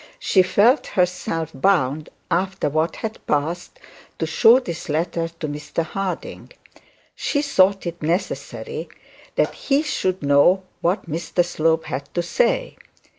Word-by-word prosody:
She 210 - +3
felt 210 +9 +3
herself 175 -3 0
bound, 150 -2 +1 0.2
after 185 -2 0
what 155 +3 0
had 220 0 -6
passed, 155 +4 -1 0.4
to - - -1
show 225 +9 +6
the 175 -10 -5 0.2
letter 165 +2 -1
to 165 -1 -6
Mr 150 +3 -3
Harding. 190 +3 -5 0.6
She 290 -1 -1
thought 195 -9 +3
it 170 0 -5
necessary 170 +5 -3 0.5
that - - +1
he 280 +1 0
should 185 - -1
know 145 +7 +4 0.2
what 180 +2 0
Mr 170 +2 0
Slope 160 -1 +1
had 140 -2 -5
to 175 - +1
say. - - 0
175 Hz, 130 wpm, -22 LUFS, 160-195 Hz, 0.6 s, show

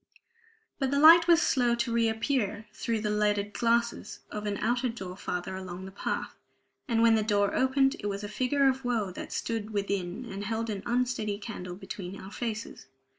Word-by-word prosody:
But 270 -2 +1
the 280 - +1
light 330 +3 +8
was 340 -2 +6
slow 245 -2 +2
to 235 0 -1
reappear 225 -1 0
through 225 0 -2
the 210 -1 -1
leaded 210 -1 +1
glasses 235 +1 0
of 210 0 -4
an 200 -1 -1
outer 240 +4 0
door 190 -6 -6
farther 185 0 -4
along 185 0 -7
the 190 - -8
path. 195 - -3 0.5
And 230 -3 +2
when 230 -1 +6
the 220 - +3
door 205 -1 +1
opened, 270 +2 +3
it 205 - -3
was 200 0 -3
a - - -3
figure 260 +6 +1
of 265 0 +1
woe 230 -6 0
that - - -8
stood 225 -2 -3
within 200 +1 -2
and 200 -3 -6
held 225 +2 -2
an 200 -2 -4
unsteady 240 -4 0
candle 195 -4 -7
between 195 0 -7
our 190 - -10
faces. 225 -1 -5
220 Hz, 185 wpm, -29 LUFS, 200-240 Hz, 0.5 s, light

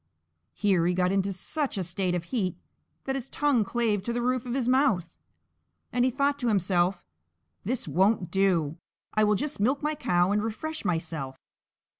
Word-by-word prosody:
Here 195 -5 +2
he 180 - +1
got 180 0 +2
into 195 0 +1
such 265 - -2
a 190 - 0
state 180 +1 -1
of 175 - -2
heat 185 -2 -2 0.5
that 270 - -2
his 270 -1 -4
tongue 285 -6 +2
clave 215 -1 0
to 235 - -3
the 240 - -1
roof 255 0 0
of 240 - -2
his 255 -3 0
mouth, 250 - +2 0.8
and 245 - +2
he 255 - +4
thought 280 +3 0
to 245 - -1
himself: 185 -3 +1 0.6
"This 240 +1 -2
won't 190 +4 +2
do; 175 -6 +2 0.4
I 215 - +3
will 210 0 +4
just 295 +4 -2
milk 260 +8 +1
my 300 +1 +1
cow, 180 -10 +1
and 210 0 +2
refresh 305 +9 -4
myself." 160 -6 -2
205 Hz, 180 wpm, -27 LUFS, 180-255 Hz, 0.8 s, he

